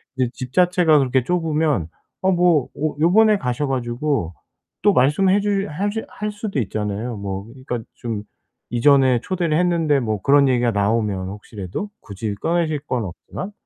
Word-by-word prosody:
이제 130 -2 0
집 130 0 -7
자체가 180 -4 +4
그렇게 130 -1 +1
좁으면 155 - 0 0.3
아 190 - +2
뭐 175 -6 +3
어 155 0 -1
요번에 210 +6 +5
가셔 125 +2 -1
가지고 125 - -1 0.5
또 205 - +5
말씀 150 +9 +3
해 200 +2 +4
주 200 -1 0
해 195 +7 -2
주 225 +2 -3
할 210 0 -4
수도 205 -6 -3
있잖아요. 105 +2 -3
뭐 100 -1 -5
그러니까 125 +1 -6 0.2
좀 110 -3 -4 0.5
"이전에 130 0 +4
초대를 170 -4 -1
했는데" 170 -4 +2
뭐 110 -4 -2
그런 140 0 +5
얘기가 120 -2 +2
나오면 100 -2 0
혹시라도 105 - -6
굳이 100 0 -5
꺼내실 160 +3 0
건 125 -6 -2
없지만 100 - -7
135 Hz, 325 characters per minute, -21 LUFS, 115-175 Hz, 0.5 s, 요번에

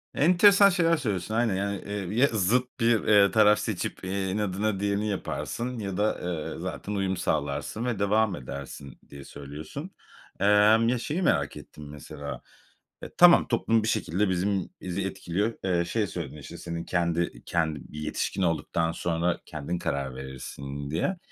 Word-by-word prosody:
Enteresan 200 +5 +6
şeyler 170 -3 +3
söylüyorsun 110 - -2
aynen. 115 -4 +2
Yani, 100 +1 -2
eee, 100 -1 -4
ya 140 - +6
zıt 120 +3 0
bir, 115 -1 +3
eee, 100 -2 +5
taraf 105 0 +5
seçip, - - -3
eee, 95 0 -2
inadına 105 0 -1
diğerini 100 +1 0
yaparsın 120 +4 -3
ya 100 -3 -4
da, 105 +1 +1 0.3
eee, - - -8
zaten 105 - -5
uyum 95 -2 -1
sağlarsın 75 - -2
ve 120 -5 -1
devam 100 -1 +2
edersin, 70 +1 -8
diye 70 -1 -10
söylüyorsun. 75 - -8 0.5
Emm, 105 +3 +5
ya 125 - +1
şeyi 155 +9 -2
merak - - +1
ettim 75 -1 -11
mesela, 70 0 -8 0.6
e, - - -7
tamam 175 0 +7
toplum 115 -2 +2
bir 110 - -1
şekilde 105 -2 0
bizim 95 +1 0
bizi 95 +1 -3
etkiliyor. 100 +4 -2
Eee, 85 -2 +1
şey 105 +3 -1
söyledin 80 -5 -6
işte 70 - -9
senin 85 -1 -5
kendi, 85 -1 0
iii, - - -16
kendi 80 -4 0
bir 75 - -6
yetişkin 75 +5 -2
olduktan 85 -1 0
sonra 85 +1 -1
kendin 80 +3 -4
karar 70 -5 -2
verirsin 70 +2 -7
diye. 175 - -1
95 Hz, 160 wpm, -27 LUFS, 80-110 Hz, 0.6 s, tamam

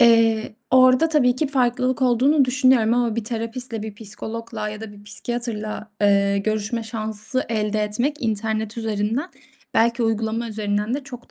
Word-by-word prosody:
Eee, 225 -2 +5 0.2
orada 255 +4 +6
tabii 255 -5 +3
ki 305 - +1
farklılık 255 -1 +1
olduğunu 260 +4 +4
düşünüyorum 255 -3 +3
ama 235 -2 +1
bir 230 - -2
terapistle, 230 0 -4
bir 215 -2 -6
psikologla 220 +1 -5
ya 215 0 -6
da 220 -2 -8
bir 205 0 -15
psikiyatrla, 215 -1 -4
eee, 200 -1 +3
görüşme 215 +2 -1
şansı 220 +2 -3
elde 215 -1 0
etmek 245 +8 -1
internet 220 0 -1
üzerinden, 225 - -1 0.4
belki 235 +1 +3
uygulama 225 +1 -1
üzerinden 210 +2 -1
de 280 -1 -4
çok 245 -4 -11
225 Hz, 150 wpm, -22 LUFS, 215-245 Hz, 0.4 s, orada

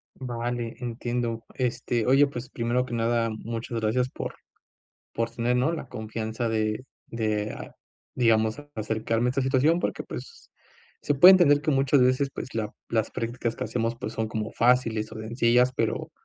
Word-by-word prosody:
Vale, 120 -2 -4
entiendo, 120 -1 -3
este, 120 -2 -1
oye, 135 +3 +5
pues, 125 -2 -7
primero 120 0 0
que 125 - -7
nada, 115 0 +1
muchas 115 +1 -4
gracias 120 +4 +1
por - - -6 0.8
por 115 0 -1
tener, 120 +1 0
¿no?, 130 +7 +2
la 155 -6 -5
confianza 110 +1 -4
de 110 +2 -1 0.2
de, 110 -2 -2
ah, - - -9 0.4
digamos 110 0 +2
acercarme 110 +2 -1
a - - +2
esta 135 +1 0
situación 135 +6 +3
porque - - -2
pues, 465 -1 -10 0.5
se 145 - +1
puede 180 +7 +10
entender 150 -6 +5
que 155 +1 0
muchas 135 0 +3
veces, 130 +2 +3
pues 130 - -6
la 110 -2 -2 0.2
las 110 -2 0
practicas 120 -1 -3
que - - -3
hacemos, 115 -1 -1
pues, 115 -3 -5
son 110 -1 -2
como 110 -1 -4
fáciles 115 -3 +2
o - - -7
sencillas, 120 +2 +2
pero 115 +8 -1
120 Hz, 165 wpm, -26 LUFS, 115-130 Hz, 0.8 s, puede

